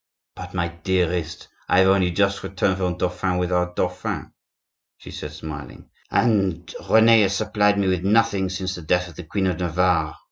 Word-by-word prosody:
"But, - - -9
my 85 0 0
dearest, 85 -2 -2 0.2
I - - +3
have 95 +1 +5
only 95 -2 +3
just 100 +3 0
returned 95 0 -1
from 90 -2 -2
Dauphine 90 0 -1
with 90 0 -1
our 90 0 +1
dauphin," 90 0 -3 0.7
she - - -12
said, 75 - -7
smiling, 75 -1 -9 0.2
"and 95 -7 +1 0.2
Rene 110 0 +6
has 100 -1 +2
supplied 105 -1 +1
me 100 -1 +1
with 90 -2 0
nothing 100 -2 +2
since 95 0 -3
the 90 - -7
death 90 +3 0
of 85 - -15
the 90 - -8
Queen 95 +4 -2
of 90 -2 -1
Navarre. 90 -2 0
90 Hz, 180 wpm, -22 LUFS, 90-100 Hz, 0.7 s, Rene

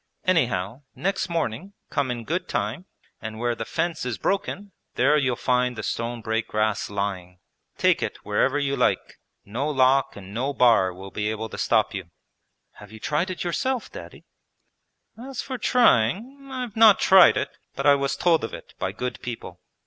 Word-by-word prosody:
Anyhow 125 - +1
next 195 0 -1
morning 165 - -3 0.2
come 140 -3 0
in 120 -1 -3
good 180 +9 -2
time, 185 - -2 0.4
and 110 -1 -6
where 120 +1 0
the 115 -1 -5
fence 165 +3 -2
is 125 -4 -3
broken 200 - -2 0.2
there 150 - +4
you'll 130 -5 +1
find 125 0 +1
the 110 - -6
stone 115 +3 -3
break 110 +1 -1
grass 110 -1 0
lying. 95 -3 -4 0.4
Take - - +3
it - - -3
wherever 130 +7 +1
you 140 -1 0
like. - - 0 0.3
No 125 +9 -2
lock 135 -1 +3
and 100 0 -10
no 135 +5 -2
bar 115 -8 +4
will 95 +2 -10
be 105 0 -2
able 110 +1 -4
to - - -8
stop 110 -2 +2
you.' 95 -3 -6 0.7
'Have 105 -1 -13
you 110 - -11
tried 150 - -1
it 185 - -4
yourself. 250 +8 -2
Daddy?' - - -11 0.9
'As 260 +1 -6
for 260 -2 -5
trying, 235 - +2
I 260 -1 -4
have 240 -4 -6
not 220 -2 +7
tried 190 -2 +7
it, - - -2 0.2
but - - -3
I 145 - +7
was 140 -1 0
told 170 -5 +2
of 115 - -4
it - - -13
by 95 - -1
good 125 +4 -5
people. 120 -2 -7
125 Hz, 180 wpm, -24 LUFS, 110-175 Hz, 0.9 s, not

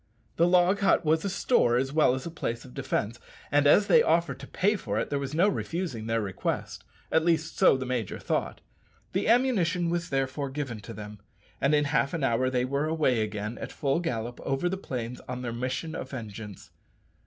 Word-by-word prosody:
The 170 - +4
log 180 +2 +4
hut 195 -3 +3
was 160 +1 +2
a 200 - -1
store 185 - +2
as 135 +2 -1
well 150 -5 +4
as 130 - -6
a 170 - -5
place 120 -7 -4
of 60 - -13
defence, 110 - -2 0.3
and 145 0 +4
as 205 +8 +6
they 235 - +6
offered 165 - +1
to 140 - -9
pay 205 +3 +1
for 105 - -3
it 115 - -2
there 140 - 0
was 140 +1 -4
no 180 +5 +4
refusing 165 - -3
their 115 0 +1
request 95 -2 -3 0.3
at 160 - +3
least 165 -1 +1
so - - +5
the 130 - -4
major 125 -5 -2
thought. - - -2 0.5
The 190 - 0
ammunition 200 -8 +2
was 170 -1 -2
therefore 135 +1 -1
given 135 -5 -4
to 115 +2 -9
them, 105 -1 -9 0.4
and 140 +2 +3
in 145 - +3
half 140 0 +1
an 160 - -2
hour 130 0 +2
they 125 -1 0
were 140 +3 -1
away 150 -7 +2
again 105 +1 -4
at - - -6
full 140 +2 0
gallop 120 -8 -3
over 135 +6 -1
the 185 - -1
plains 125 -9 -5
on 125 0 -4
their 120 -2 -3
mission 130 +6 -3
of 135 - -5
vengeance. 110 -5 -8
140 Hz, 210 wpm, -28 LUFS, 120-170 Hz, 0.5 s, as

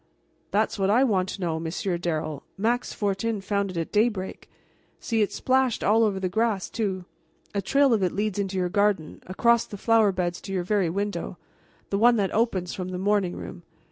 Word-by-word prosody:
"That's 215 0 0
what 195 0 +2
I 235 +6 +5
want 190 -7 +1
to 200 - -6
know, 165 -2 -1
Monsieur 170 +3 -2
Darrel. 155 -4 -3 0.2
Max 235 +5 0
Fortin 205 +2 -1
found 200 0 -1
it 185 - -6
at 165 - -3
daybreak. 210 -3 0 0.5
See, 225 -2 0
it's 205 - 0
splashed 260 -2 +1
all 220 +3 +4
over 200 -3 +1
the 190 - -1
grass, 215 0 0
too. 195 -5 -2 0.5
A 200 - 0
trail 275 +6 +3
of 215 - +2
it 180 -2 +1
leads 205 -1 -2
into 195 -1 -2
your 180 -1 +1
garden, 200 -4 0
across 235 +5 +3
the 205 - -8
flower 225 0 +4
beds 175 -2 -2
to 195 - -8
your 185 -2 0
very 195 -2 +1
window, 200 +4 -3 0.5
the 200 - +1
one 240 +2 +6
that 200 -4 0
opens 195 -6 0
from 185 -1 -4
the 185 - -4
morning 195 -1 +1
room. 180 - -8
200 Hz, 200 wpm, -26 LUFS, 185-220 Hz, 0.5 s, one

